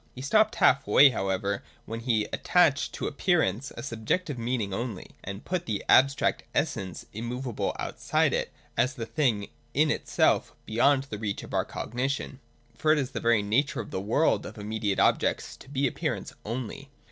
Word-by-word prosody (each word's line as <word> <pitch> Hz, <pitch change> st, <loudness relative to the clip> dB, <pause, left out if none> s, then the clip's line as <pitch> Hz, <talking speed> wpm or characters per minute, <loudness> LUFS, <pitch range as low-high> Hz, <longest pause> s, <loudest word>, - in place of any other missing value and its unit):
He 130 Hz, -, -7 dB
stopped 215 Hz, +9 st, +3 dB
half 135 Hz, +1 st, +4 dB
way 140 Hz, -1 st, +7 dB
however, 100 Hz, -1 st, -1 dB, 0.2 s
when 115 Hz, +1 st, -5 dB
he 115 Hz, -2 st, +1 dB
attached 160 Hz, -6 st, +3 dB
to -, -, -4 dB
Appearance 140 Hz, -, +1 dB
a 120 Hz, -, -5 dB
subjective 140 Hz, +6 st, -2 dB
meaning 115 Hz, -4 st, -1 dB
only, 115 Hz, -2 st, -4 dB
and 100 Hz, +1 st, -7 dB
put 180 Hz, -1 st, -2 dB
the 105 Hz, -2 st, -2 dB
abstract 135 Hz, +1 st, +4 dB
essence 95 Hz, -2 st, -2 dB
immovable 120 Hz, +2 st, -3 dB
out -, -, -5 dB
side -, -, +2 dB
it -, -, -1 dB, 0.2 s
as 130 Hz, +4 st, +1 dB
the 115 Hz, -4 st, -4 dB
thing 115 Hz, -7 st, 0 dB, 0.3 s
in -, -, +4 dB
itself -, -, +1 dB
beyond 135 Hz, +5 st, +3 dB
the 110 Hz, -7 st, -7 dB
reach 105 Hz, -2 st, -3 dB
of -, -, -10 dB
our -, -, +1 dB
cogni 125 Hz, +4 st, -2 dB
tion. 140 Hz, -1 st, -4 dB, 0.3 s
For 155 Hz, +6 st, +2 dB
it 155 Hz, -, +4 dB
is 135 Hz, -2 st, -1 dB
the -, -, -3 dB
very 115 Hz, -3 st, +3 dB
nature 120 Hz, +8 st, +1 dB
of -, -, -6 dB
the 95 Hz, -, -2 dB
world 115 Hz, +11 st, +2 dB
of 110 Hz, -, -10 dB
immediate 105 Hz, -1 st, -2 dB
objects -, -, +1 dB
to -, -, -15 dB
be 140 Hz, 0 st, 0 dB
appearance 125 Hz, -, -2 dB
only. 125 Hz, +4 st, -5 dB
120 Hz, 180 wpm, -28 LUFS, 105-140 Hz, 0.3 s, way